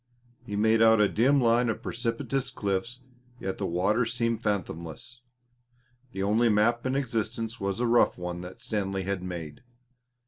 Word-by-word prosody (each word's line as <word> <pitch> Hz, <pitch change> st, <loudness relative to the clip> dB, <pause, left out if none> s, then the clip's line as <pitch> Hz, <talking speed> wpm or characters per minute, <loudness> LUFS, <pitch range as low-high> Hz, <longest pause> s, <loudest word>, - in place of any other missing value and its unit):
He 105 Hz, -, -5 dB
made 110 Hz, +2 st, +3 dB
out 110 Hz, -1 st, +6 dB
a 105 Hz, -, +5 dB
dim 130 Hz, +8 st, +3 dB
line 120 Hz, 0 st, +3 dB
of 110 Hz, -, -3 dB
precipitous 120 Hz, +3 st, -2 dB
cliffs, 110 Hz, +2 st, -3 dB, 0.4 s
yet 95 Hz, 0 st, -4 dB
the -, -, -1 dB
water 95 Hz, +8 st, +1 dB
seemed 115 Hz, 0 st, -1 dB
fathomless 90 Hz, +4 st, -4 dB, 0.9 s
the 95 Hz, -3 st, -3 dB
only 110 Hz, +4 st, +3 dB
map 115 Hz, +4 st, +2 dB
in 130 Hz, -, 0 dB
existence 115 Hz, -3 st, -2 dB
was 100 Hz, +2 st, -2 dB
a 120 Hz, -, +1 dB
rough 120 Hz, 0 st, +3 dB
one 90 Hz, 0 st, -5 dB
that 90 Hz, +1 st, -10 dB
Stanley 95 Hz, -2 st, -2 dB
had 95 Hz, 0 st, -2 dB
made. 85 Hz, -5 st, -6 dB
110 Hz, 160 wpm, -28 LUFS, 95-120 Hz, 0.9 s, out